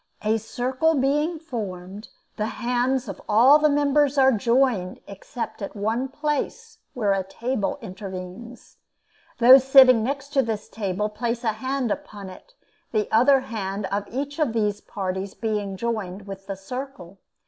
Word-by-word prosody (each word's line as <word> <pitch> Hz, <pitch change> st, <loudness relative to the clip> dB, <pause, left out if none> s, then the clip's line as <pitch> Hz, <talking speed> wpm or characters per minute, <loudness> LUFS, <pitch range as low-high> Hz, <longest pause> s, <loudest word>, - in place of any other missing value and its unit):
A 220 Hz, +1 st, +1 dB
circle 255 Hz, +8 st, 0 dB
being 295 Hz, +5 st, +1 dB
formed, 205 Hz, -, -7 dB, 0.3 s
the 215 Hz, -1 st, -2 dB
hands 250 Hz, +1 st, 0 dB
of 195 Hz, -, -7 dB
all 250 Hz, +8 st, +7 dB
the 305 Hz, 0 st, +4 dB
members 290 Hz, 0 st, +2 dB
are 265 Hz, -1 st, +6 dB
joined 235 Hz, -4 st, +1 dB
except 205 Hz, +4 st, -7 dB
at 200 Hz, -, -6 dB
one 220 Hz, +5 st, -1 dB
place 300 Hz, -, -3 dB, 0.2 s
where 210 Hz, -5 st, +1 dB
a 195 Hz, -, 0 dB
table 225 Hz, +4 st, -3 dB
intervenes. 195 Hz, +3 st, -9 dB, 0.6 s
Those 255 Hz, +2 st, +8 dB
sitting 260 Hz, -3 st, +7 dB
next 275 Hz, +3 st, -3 dB
to 285 Hz, -2 st, +2 dB
this 220 Hz, -4 st, -4 dB
table 205 Hz, -1 st, -2 dB
place 230 Hz, +3 st, -3 dB
a 220 Hz, -2 st, +1 dB
hand 260 Hz, +1 st, -2 dB
upon 200 Hz, -2 st, -6 dB
it, -, -, -16 dB, 0.4 s
the 215 Hz, -2 st, 0 dB
other 260 Hz, +4 st, +5 dB
hand 200 Hz, -4 st, -4 dB
of 205 Hz, 0 st, -2 dB
each 285 Hz, +5 st, -4 dB
of 290 Hz, -8 st, +1 dB
these 210 Hz, -2 st, 0 dB
parties 190 Hz, 0 st, -4 dB
being 210 Hz, -3 st, -3 dB
joined 205 Hz, -4 st, -3 dB
with 195 Hz, -1 st, -9 dB
the 195 Hz, -, -4 dB
circle. 195 Hz, -3 st, -8 dB
230 Hz, 150 wpm, -24 LUFS, 200-265 Hz, 0.6 s, Those